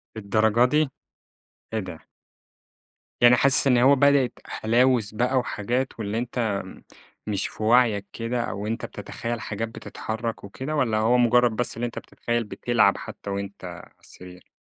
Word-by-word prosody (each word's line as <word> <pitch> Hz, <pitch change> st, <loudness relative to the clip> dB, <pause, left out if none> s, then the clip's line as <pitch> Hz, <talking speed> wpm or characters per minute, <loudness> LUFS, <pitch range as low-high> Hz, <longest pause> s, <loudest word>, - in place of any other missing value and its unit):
للدرجة 110 Hz, +2 st, +2 dB
دي! 150 Hz, +2 st, +2 dB, 0.8 s
إيه 110 Hz, -, 0 dB
ده؟! 85 Hz, -5 st, -9 dB, 1.2 s
يعني 120 Hz, 0 st, +8 dB
حاسس 140 Hz, +2 st, +4 dB
إن 125 Hz, -2 st, +4 dB
هو 135 Hz, +3 st, +6 dB
بدأِت 140 Hz, -2 st, +3 dB
هلاوس 115 Hz, -1 st, +1 dB
بقى 125 Hz, +4 st, +1 dB
وحاجات، 125 Hz, +1 st, -2 dB
واللي 105 Hz, +1 st, -3 dB
أنت 115 Hz, -5 st, -2 dB, 0.6 s
مش 100 Hz, -2 st, -1 dB
في 110 Hz, -, -8 dB
وعيك 110 Hz, -3 st, +3 dB
كده، 120 Hz, +1 st, -2 dB
أو 105 Hz, -1 st, -4 dB
أنت 115 Hz, -, -3 dB
بتتخيل 115 Hz, -1 st, -5 dB
حاجات 110 Hz, +2 st, -3 dB
بتتحرك 115 Hz, 0 st, -5 dB
وكده، 130 Hz, +9 st, -5 dB
والّا 120 Hz, -7 st, +1 dB
هو 115 Hz, +3 st, +3 dB
مجرد 120 Hz, 0 st, +4 dB
بس 120 Hz, +2 st, -1 dB
اللي 120 Hz, +2 st, -2 dB
أنت 120 Hz, -, -5 dB
بتتخيل 120 Hz, 0 st, -3 dB
بتلعب 110 Hz, -1 st, +1 dB
حتى -, -, -8 dB
وأنت 100 Hz, 0 st, -5 dB
على 90 Hz, 0 st, -10 dB
السرير؟ 90 Hz, 0 st, -14 dB
115 Hz, 150 wpm, -24 LUFS, 105-125 Hz, 1.2 s, يعني